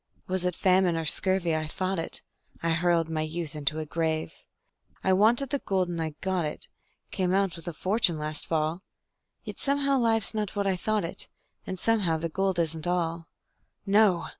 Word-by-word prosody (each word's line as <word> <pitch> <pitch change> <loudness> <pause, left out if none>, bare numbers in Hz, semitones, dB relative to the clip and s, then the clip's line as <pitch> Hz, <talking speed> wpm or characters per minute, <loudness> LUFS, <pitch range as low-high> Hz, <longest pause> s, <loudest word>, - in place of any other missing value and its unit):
Was 185 -1 -1
it 180 -1 0
famine 185 -2 +3
or 165 - -2
scurvy 175 +1 +2
I 155 0 -1
fought 185 +3 -2
it; 165 - -3 0.4
I 165 - +2
hurled 170 0 +2
my 160 -1 -2
youth 155 -1 -4
into 150 +1 -1
a 155 - -3
grave. 160 0 -1 0.7
I 190 - +3
wanted 235 +7 +3
the 285 - 0
gold, 185 -5 0
and 170 -1 -3
I 155 -2 -3
got 190 -2 0
it 150 - -4 0.4
Came 185 -2 +1
out 195 -2 +1
with 165 0 -10
a - - -1
fortune 185 0 +2
last 150 0 -2
fall, 160 +2 0 0.6
Yet - - -7
somehow 280 -1 +2
life's 225 -2 +2
not 210 -2 -2
what 200 -1 0
I 195 -1 +2
thought 215 +1 0
it, 165 - -4 0.4
And 185 - -3
somehow 195 -6 +2
the 165 +1 -3
gold 190 +2 0
isn't 160 -1 0
all. 170 -2 -1 0.6
No! 200 -3 +4
175 Hz, 190 wpm, -28 LUFS, 165-195 Hz, 0.7 s, No